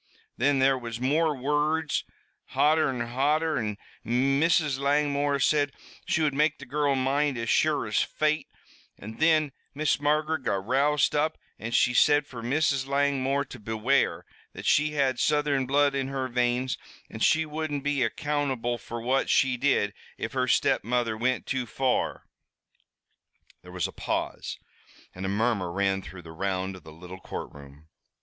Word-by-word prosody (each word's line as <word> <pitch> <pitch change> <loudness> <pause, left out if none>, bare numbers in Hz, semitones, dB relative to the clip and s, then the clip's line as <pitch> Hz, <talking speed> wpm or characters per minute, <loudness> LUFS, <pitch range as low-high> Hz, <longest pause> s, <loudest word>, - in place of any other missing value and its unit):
Thin 140 +3 +3
there 135 0 +3
was 115 -2 -6
more 150 +4 +1
wurruds, 150 +3 0 0.5
hotter 155 0 +3
an' 120 -3 -3
hotter, 150 +3 +1
an' 105 -3 -3 0.3
Mrs. 135 +3 +2
Langmore 145 0 +1
said 145 0 +2 0.3
she 160 - +1
would 150 -2 +1
make 150 +2 +2
the 140 - -10
girrul 140 +1 0
mind 135 +1 +1
as 115 -1 -1
sure - - +2
as - - +1
fate, 155 0 0 0.5
an' 110 +3 -9
thin 155 -2 +3 0.2
Miss 150 +1 +1
Margaret 150 +1 +1
got 95 -6 -2
roused 140 +4 +2
up 155 +2 0 0.2
an' 110 - -5
she 125 +1 +3
said 145 +3 +4
fer 125 -5 -9
Mrs. 135 +2 0
Langmore 140 0 +1
to - - -11
beware, 110 +6 0 0.3
that - - -9
she 150 +1 +3
had 135 -4 +1
Southern 145 -3 +1
blood 140 +1 +3
in 135 -1 -1
her 135 -1 -2
veins, 125 +1 0 0.3
an' - - -9
she 160 0 +3
wouldn't 150 -2 -4
be 145 -2 0
accountable 130 -2 -1
fer 115 +2 -7
what 130 +4 0
she 130 -2 +3
did, 125 -6 +1 0.2
if - - -5
her - - 0
stepmother 120 0 +1
wint 125 +3 -1
too 130 -2 -2
far." 130 +2 -1 1.4
There 90 - -13
was 90 -2 -2
a - - -9
pause, - - -3 0.6
and 95 +1 -5
a - - -1
murmur 100 -3 0
ran 95 +1 0
the 90 -4 -11
round 95 +2 -2
of - - -15
the 80 - -12
little 90 +4 -11
courtroom. 70 -3 -9
135 Hz, 155 wpm, -27 LUFS, 120-145 Hz, 1.4 s, said